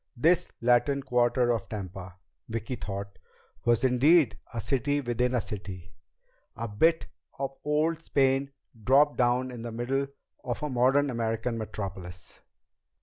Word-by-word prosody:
This 170 Hz, +7 st, +3 dB
Latin 125 Hz, +4 st, +3 dB
Quarter 120 Hz, 0 st, +2 dB
of 115 Hz, -4 st, -2 dB
Tampa, 95 Hz, -3 st, -7 dB, 0.3 s
Vicki 115 Hz, +2 st, -3 dB
thought, 100 Hz, -2 st, -6 dB, 0.5 s
was 120 Hz, 0 st, +3 dB
indeed 130 Hz, +3 st, +4 dB, 0.2 s
a 115 Hz, -, -4 dB
city 145 Hz, +4 st, 0 dB
within 125 Hz, -1 st, 0 dB
a -, -, +3 dB
city, 95 Hz, -4 st, -7 dB, 0.6 s
a 115 Hz, +2 st, -4 dB
bit 160 Hz, +11 st, +2 dB, 0.3 s
of 135 Hz, -1 st, -2 dB
old 155 Hz, +2 st, +1 dB
Spain 135 Hz, -2 st, +2 dB, 0.3 s
dropped 140 Hz, +5 st, +4 dB
down 125 Hz, +1 st, +2 dB
in 120 Hz, -2 st, -7 dB
the 120 Hz, 0 st, -5 dB
middle 130 Hz, +4 st, -1 dB, 0.4 s
of 125 Hz, +4 st, -4 dB
a 150 Hz, -, -2 dB
modern 135 Hz, +3 st, +3 dB
American 115 Hz, 0 st, -1 dB
metropolis. 95 Hz, -4 st, -6 dB
120 Hz, 135 wpm, -28 LUFS, 110-140 Hz, 0.6 s, indeed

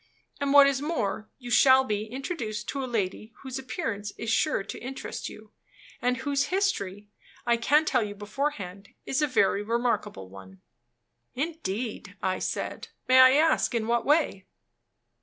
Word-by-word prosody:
And 280 Hz, -1 st, 0 dB
what 285 Hz, 0 st, +9 dB
is 275 Hz, -1 st, +1 dB
more, 220 Hz, -9 st, -2 dB
you 245 Hz, -2 st, -8 dB
shall 265 Hz, +1 st, +6 dB
be 210 Hz, -4 st, -2 dB
introduced 230 Hz, -, -5 dB
to 275 Hz, -1 st, -3 dB
a 255 Hz, -, -4 dB
lady 215 Hz, 0 st, -3 dB
whose 265 Hz, 0 st, -5 dB
appearance 205 Hz, -5 st, -4 dB
is 225 Hz, -, -3 dB
sure 300 Hz, -4 st, +1 dB
to -, -, -7 dB
interest 265 Hz, +2 st, -6 dB
you, 215 Hz, 0 st, -13 dB, 0.5 s
and 250 Hz, +1 st, +1 dB
whose 275 Hz, +1 st, 0 dB
history, 210 Hz, -, -1 dB, 0.4 s
I 235 Hz, -1 st, +4 dB
can 295 Hz, +7 st, +3 dB
tell -, -, +2 dB
you 205 Hz, -1 st, -4 dB
beforehand, 205 Hz, -3 st, -4 dB, 0.2 s
is 270 Hz, -, 0 dB
a 300 Hz, -, +3 dB
very 200 Hz, -6 st, +2 dB
remarkable 230 Hz, -, -1 dB
one." 95 Hz, 0 st, -13 dB, 0.8 s
"Indeed," 250 Hz, -, -4 dB
I 185 Hz, 0 st, -1 dB
said. -, -, -4 dB, 0.2 s
"May 255 Hz, 0 st, +6 dB
I 260 Hz, 0 st, +9 dB
ask 310 Hz, -3 st, +3 dB
in 225 Hz, -2 st, 0 dB
what 235 Hz, 0 st, +1 dB
way?" 290 Hz, -, +1 dB
240 Hz, 160 wpm, -27 LUFS, 205-275 Hz, 0.8 s, what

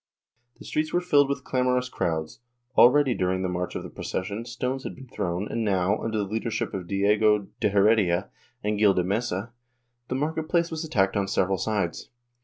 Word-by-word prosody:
The -, -, -13 dB
streets 155 Hz, +1 st, -1 dB
were 175 Hz, -, +2 dB
filled 145 Hz, -6 st, +3 dB
with 140 Hz, -, -2 dB
clamorous 125 Hz, -1 st, +1 dB
crowds; 80 Hz, -8 st, -3 dB, 0.4 s
already 135 Hz, +1 st, +6 dB
during 95 Hz, -2 st, 0 dB
the -, -, 0 dB
march 90 Hz, 0 st, -3 dB
of -, -, -4 dB
the -, -, -7 dB
procession, 100 Hz, +5 st, -4 dB
stones 125 Hz, +2 st, -3 dB
had -, -, -6 dB
been 135 Hz, 0 st, -12 dB
thrown 90 Hz, -4 st, -3 dB
and 115 Hz, -, -2 dB
now, 100 Hz, 0 st, +1 dB
under 110 Hz, -1 st, -2 dB
the 105 Hz, -, +1 dB
leadership 110 Hz, +3 st, -3 dB
of 95 Hz, -3 st, -5 dB
Diego 105 Hz, +1 st, +2 dB
de -, -, +2 dB
Heredia 100 Hz, -3 st, +3 dB, 0.3 s
and 105 Hz, 0 st, -1 dB
Gil 105 Hz, -2 st, +5 dB
de 90 Hz, -, +2 dB
Mesa, 105 Hz, +2 st, -2 dB, 0.5 s
the 130 Hz, -, -2 dB
market 155 Hz, +3 st, -2 dB
place 170 Hz, -1 st, +1 dB
was 160 Hz, 0 st, -3 dB
attacked 95 Hz, -11 st, +1 dB
on 100 Hz, -1 st, 0 dB
several 95 Hz, -1 st, +1 dB
sides. 105 Hz, -6 st, -2 dB
105 Hz, 190 wpm, -26 LUFS, 95-125 Hz, 0.5 s, already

